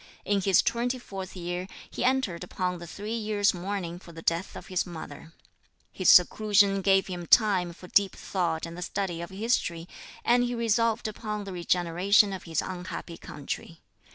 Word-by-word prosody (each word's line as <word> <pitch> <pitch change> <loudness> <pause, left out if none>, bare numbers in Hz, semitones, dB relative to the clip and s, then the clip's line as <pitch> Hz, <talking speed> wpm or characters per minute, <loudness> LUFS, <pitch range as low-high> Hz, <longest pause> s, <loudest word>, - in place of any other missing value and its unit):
In 200 -1 +1
his 190 -1 +4
twenty 245 +2 0
fourth 195 -6 -8
year 175 +1 -4 0.2
he - - -4
entered 250 -10 +1
upon 180 0 -3
the 170 - -9
three 210 +6 -6
years' 215 -2 +1
mourning 180 -1 -4
for 175 - -13
the 165 0 -10
death 170 +3 -1
of - - -8
his 185 -1 0
mother. 160 -3 -9 0.6
His 185 - +1
seclusion 200 +1 +5
gave 195 0 +4
him 175 -2 -6
time 195 -6 +4
for 180 +2 -12
deep 200 +1 +3
thought 170 -4 -2
and 165 0 -8
the 180 - -7
study 175 -2 -3
of 170 - -6
history, 190 -5 -1 0.4
and 245 +1 +4
he 245 0 -1
resolved 230 0 +1
upon 210 -1 -4
the 195 -1 -7
regeneration 180 +4 +3
of 190 - -7
his 165 -3 -1
unhappy 180 -2 -6
country. 155 +3 -7
190 Hz, 175 wpm, -28 LUFS, 175-210 Hz, 0.6 s, seclusion